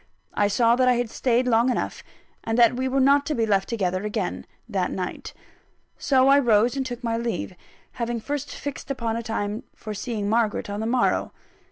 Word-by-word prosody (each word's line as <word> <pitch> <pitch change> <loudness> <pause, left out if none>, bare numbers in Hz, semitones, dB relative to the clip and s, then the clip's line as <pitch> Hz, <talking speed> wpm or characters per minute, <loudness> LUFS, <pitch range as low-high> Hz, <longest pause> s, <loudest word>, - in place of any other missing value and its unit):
I 205 - +2
saw 230 +3 +3
that 255 0 +3
I 250 - +5
had 240 -2 -2
stayed 250 0 +1
long 235 +1 +3
enough, 250 - -2 0.4
and 225 0 -1
that 240 0 +5
we 260 +1 -1
were 265 +1 +1
not 280 +2 +5
to 305 - -1
be 230 - +1
left 195 -2 +1
together 185 -4 -1
again, 210 -3 -3 0.2
that 195 -5 -1
night. 185 -1 -5 0.7
So 265 -1 +3
I 280 +1 +6
rose 235 -1 +3
and 270 - -1
took 245 -1 -6
my 230 -1 0
leave, 230 -4 -3 0.4
having 235 -1 -3
first 285 +4 -4
fixed 285 -1 -7
a 275 - -1 0.3
time 215 -1 -3
for 215 - -7
seeing 210 -1 -3
Margaret 215 -2 0
on 205 - -4
the 220 - -2
morrow. 245 +1 +1
235 Hz, 195 wpm, -24 LUFS, 210-255 Hz, 0.7 s, I